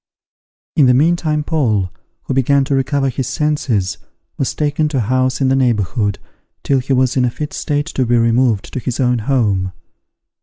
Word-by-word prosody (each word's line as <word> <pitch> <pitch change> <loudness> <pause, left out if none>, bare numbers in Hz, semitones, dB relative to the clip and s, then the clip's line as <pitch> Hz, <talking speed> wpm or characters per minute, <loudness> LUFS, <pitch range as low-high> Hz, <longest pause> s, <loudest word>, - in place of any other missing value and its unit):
In 145 -4 +5
the 125 - +5
meantime 155 +1 +1
Paul, 110 - 0 0.3
who - - -3
began 135 +2 +3
to 140 +1 -2
recover 135 +1 +1
his 130 0 -3
senses, 135 -10 -1 0.4
was 135 - -2
taken 150 0 0
to 150 -2 -2
a - - +2
house 130 +4 0
in 135 - +3
the 135 - +3
neighbourhood, 105 -4 0 0.5
till 135 -1 +2
he 130 +2 -5
was 130 -1 +2
in 130 - +2
a 125 - +2
fit 150 +5 -6
state 145 -1 -1
to 135 -5 -1
be 120 +1 +3
removed 115 -2 +1
to - - -2
his 125 -1 -4
own 125 -2 +2
home. 105 -7 0
130 Hz, 185 wpm, -17 LUFS, 120-140 Hz, 0.5 s, In